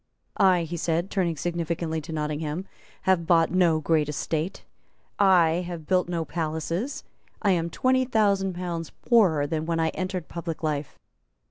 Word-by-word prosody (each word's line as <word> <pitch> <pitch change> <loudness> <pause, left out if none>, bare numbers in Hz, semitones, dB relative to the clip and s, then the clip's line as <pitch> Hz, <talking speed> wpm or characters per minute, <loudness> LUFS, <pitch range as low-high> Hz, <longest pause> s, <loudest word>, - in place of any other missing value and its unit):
"I," 185 -3 +4
he 170 +1 -5
said, 170 +3 -1
turning 175 -5 0
significantly 170 -1 -2
to 155 - -9
Nottingham, 150 +2 -3 0.4
"have 180 -3 +2
bought 165 -2 +4
no 175 -3 +3
great 155 -1 +1
estate; 155 +4 -3 0.6
I 180 -3 +4
have 170 -3 -6
built 180 +1 +1
no 170 -2 -1
palace; 165 - -3 0.4
I 200 - +4
am 170 -2 +1
twenty 260 +7 +2
thousand 200 -5 +2
pounds 170 -3 -4
poorer 185 - +3
than 155 +2 -2
when 165 -1 0
I 160 0 +2
entered 185 -1 -4
public 170 -1 -5
life. 150 -2 -2
170 Hz, 150 wpm, -26 LUFS, 160-185 Hz, 0.6 s, I